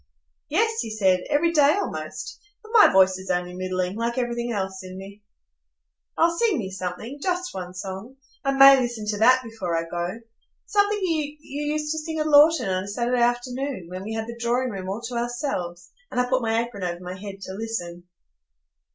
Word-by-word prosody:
"Yes," 445 +8 +1
he 225 - -2
said, 190 -4 +2
"every 335 +4 +3
day, 295 0 +5
almost. 405 - -5 0.2
But 435 - -13
my 445 - +8
voice 190 0 +4
is 190 - -9
only 180 0 -1
middling, 185 0 -2
like 235 +2 -2
everything 240 -1 -1
else 190 -3 -3
in 185 0 -9
me." 200 +2 -10 1.0
"Oh, 335 +1 +3
sing 455 -7 +3
me 195 -5 -4
something,—just 265 - -3
one 180 -1 -6
song. 195 +6 -7 0.3
I 275 - +1
may 275 0 +9
listen 240 -4 -3
to 205 -1 -1
that 255 +3 +5
before 210 -8 -3
I 165 - 0
go,—something 230 - -2
you 305 -4 -1
used 300 +1 -3
to 315 - -1
sing 320 +1 -5
at 305 - 0
Lorton 300 -4 +6
on 185 0 -1
a - - -9
Saturday 240 +4 0
afternoon, 245 -4 -1
when 185 +1 -6
we 220 +2 -5
had 220 0 -2
the 235 +1 -8
drawing 245 +2 0
room 190 -2 -5
all 200 +4 -3
to 240 +1 -5
ourselves, 235 -8 -3 0.2
and - - -2
I 250 - +2
put 260 +1 +1
my 225 0 +1
apron 235 -4 -9
over 175 -1 -2
my 180 0 -5
head 195 +1 -8
to 190 - -6
listen." 180 -5 -5
230 Hz, 190 wpm, -24 LUFS, 190-275 Hz, 1.0 s, may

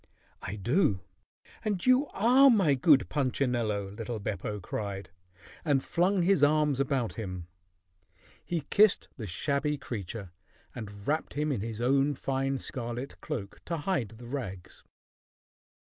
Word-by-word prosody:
"I 95 - -5
do, 105 - +1 0.6
and 205 -4 -1
you 255 +3 +5
are 255 +6 +5
my 195 - +4
good 140 +1 +5
Punchinello!" 120 -7 0
little 115 +3 -5
Beppo 105 +1 -3
cried, 100 0 -5 0.5
and 140 -4 +2
flung 180 +2 +2
his 180 -4 +3
arms 150 -2 +3
about 135 -4 0
him. 90 -5 -5 1.0
He 170 -2 -2
kissed 210 -1 +4
the 110 -5 -5
shabby 140 - 0
creature 100 -5 -6 0.4
and 100 -4 -8
wrapped 155 +2 -1
him 150 +1 0
in 125 - -1
his 110 0 -5
own 135 +3 +3
fine 135 +1 -1
scarlet 120 +1 -5
cloak 115 -11 -5
to 170 - -2
hide 145 - -1
the 120 - -11
rags. 115 -9 -6
135 Hz, 135 wpm, -29 LUFS, 105-155 Hz, 1.0 s, you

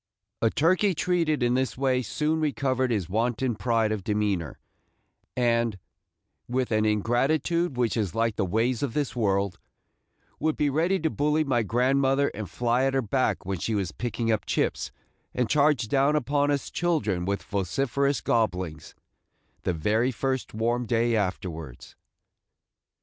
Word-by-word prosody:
A 115 - +4
turkey 185 - +2
treated 160 -5 +1
in 120 0 +2
this 130 0 0
way 130 -1 +1
soon 150 +6 -1
recovered 130 -4 0
his 105 -8 -1
wonted 115 +3 -1
pride 115 -3 +1
of 105 -3 -2
demeanor, 100 - -1 0.8
and, 115 -3 +1 0.7
with 125 0 -1
an 110 0 +2
ingratitude 135 - +1
which 120 -2 +1
is 105 -7 -1
like 115 -1 +1
the 105 - 0
ways 115 +6 0
of 140 -5 -2
this 145 -4 -1
world, 100 -5 0 0.8
would 155 +1 0
be 145 -1 +1
ready 170 +7 +2
to 160 -1 0
bully 150 +2 +1
my 130 -5 +1
grandmother 135 +5 +2
and 105 -2 -6
fly 120 +2 +1
at 135 0 0
her 135 - +1
back 115 -3 0
when 95 -1 -3
she 110 - -1
was 95 -4 -1
picking 120 -1 -2
up 110 - -1
chips, - - -1 0.4
and 125 -3 0
charge 145 -5 +3
down 140 +5 +2
upon 145 0 +1
us 145 -1 -1
children 110 - 0
with 100 +1 -2
vociferous 135 +9 0
gobblings, 90 -9 -1 0.7
the 90 - -1
very 110 +10 +1
first 130 +3 -2
warm 120 +2 -1
day 115 0 +2
afterwards. 85 - -4
120 Hz, 150 wpm, -26 LUFS, 105-140 Hz, 0.8 s, A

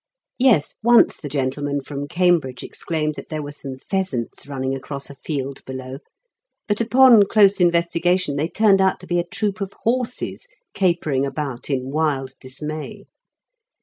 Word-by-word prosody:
Yes; 240 - +4
once 235 +1 +5
the 145 - -7
gentleman 140 +1 -1
from 140 +1 -6
Cambridge 170 -6 +1
exclaimed 155 -2 -3
that - - -10
there 155 -1 -4
were 145 - -6
some 135 -2 -8
pheasants 140 - -3
running 135 -1 -3
across 140 +1 -6
a - - -12
field 140 -1 -5
below; 130 0 -7 0.7
but 205 +1 0
upon 235 -3 +6
close 205 -2 +4
investigation 170 -1 +2
they 150 +3 -1
turned 200 -2 +4
out 190 -1 +2
to - - -11
be 175 -1 0
a - - +1
troop 200 +2 -3
of 195 0 -4
horses 250 - -2 0.3
capering 170 -8 +1
about 140 -2 -4
in 130 -1 -2
wild 140 -4 -1
dismay. 150 +4 -7
155 Hz, 150 wpm, -21 LUFS, 135-190 Hz, 0.7 s, upon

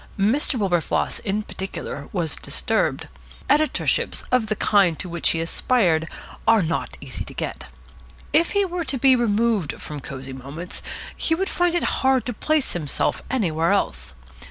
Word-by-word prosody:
Mr. 225 +8 +2
Wilberfloss 180 -6 0
in 210 -1 -1
particular 190 -8 -6
was 170 -6 0
disturbed. - - -1 0.4
Editorships 300 +2 +2
of 250 -3 +3
the 215 - 0
kind 195 -6 +3
which 170 -2 0
he 165 - 0
aspired 165 -2 +2
to - - -9 0.4
are 225 -3 +6
not 165 0 -2
easy - - -5
to - - -11
get. - - -4 0.7
If 330 +3 +3
he 405 -1 +3
were 355 -1 -2
to 280 - -1
be 265 +1 +6
removed 225 - +1
from 150 -1 -6
Cosy 135 0 -7
Moments 140 +7 -7 0.3
he 325 - +1
would 385 +3 -1
find 350 -1 +1
it 345 - +1 0.2
hard 265 -1 +3
to 245 - -2
place 305 +5 0
himself 155 -5 -1
anywhere 170 -8 +1
else. 200 - -1
205 Hz, 155 wpm, -23 LUFS, 165-265 Hz, 0.7 s, are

